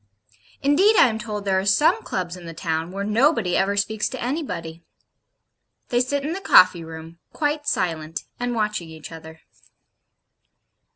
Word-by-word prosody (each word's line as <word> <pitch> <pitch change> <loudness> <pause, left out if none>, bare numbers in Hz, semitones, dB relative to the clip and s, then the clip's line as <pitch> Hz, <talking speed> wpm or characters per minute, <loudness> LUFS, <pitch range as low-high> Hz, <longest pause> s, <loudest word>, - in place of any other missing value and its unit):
Indeed 365 +10 +4
I 255 - +6
am 220 -1 -4
told 210 -2 -5
there 190 -1 +2
are - - -2
some 200 +10 +3
Clubs 180 -1 -4
in 175 -2 -11
the 165 - -8
town 160 0 -2
where 195 +1 -4
nobody 220 - +2
ever 200 +1 +1
speaks 210 +1 0
to 260 - -7
anybody. 235 - -4 1.1
They 245 - +2
sit 275 +3 -1
in 315 - -2
the 385 - -5
coffee 185 - +6
room, 160 +1 -10
quite 295 -1 -1
silent, 165 -6 -2 0.2
and 245 0 -2
watching 210 -6 -2
each 160 0 -10
other. 160 0 -11
200 Hz, 160 wpm, -23 LUFS, 165-250 Hz, 1.1 s, I